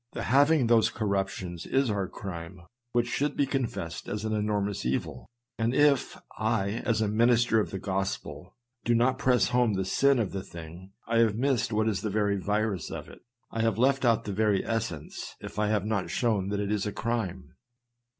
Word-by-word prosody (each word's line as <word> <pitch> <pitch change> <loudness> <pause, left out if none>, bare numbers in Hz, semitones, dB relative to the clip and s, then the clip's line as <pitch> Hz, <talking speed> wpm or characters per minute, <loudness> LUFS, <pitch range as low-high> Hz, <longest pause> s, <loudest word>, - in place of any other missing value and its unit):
The - - -4
having 145 +2 +4
those 115 -2 +4
corruptions 95 -4 -3
is 135 -3 +2
our 100 -2 -1
crime 85 -2 -7 0.3
which 120 0 +2
should 145 +4 -1
be 140 - +3
confessed 115 - -3
as 105 +1 -3
an 110 - -1
enormous 105 -2 -1
evil; 65 +2 -3 0.3
and 115 +3 +1
if 145 -3 +3 0.2
I, 100 +1 +1
as 115 -2 +1
a 110 - +2
minister 115 +1 +3
of 105 - -1
the 95 - -4
gospel, 95 0 -4 0.3
do 120 - +2
not 130 +3 +2
press 125 -2 +3
home 125 -3 +2
the 95 -1 -1
sin 140 +7 +3
of 110 -5 0
the 95 - -3
thing, 85 +2 -11
I 115 - +2
have 115 -3 +3
missed 125 -1 +1
what 110 0 +1
is 105 -3 0
the 110 - -2
very 100 0 +1
virus 105 -3 -1
of - - -7
it. - - -13 0.3
I 115 - -2
have 115 -1 +1
left 135 +3 +3
out 115 -2 +3
the 100 - -4
very 105 -1 +1
essence, 115 -10 -4
if - - -7
I 105 - +2
have 105 -2 +1
not 105 -3 -1
shown 105 -6 0
that 100 0 -1
it 105 0 -1
is 105 -1 0
a - - -2
crime. 110 -5 -3
110 Hz, 200 wpm, -28 LUFS, 100-120 Hz, 0.3 s, having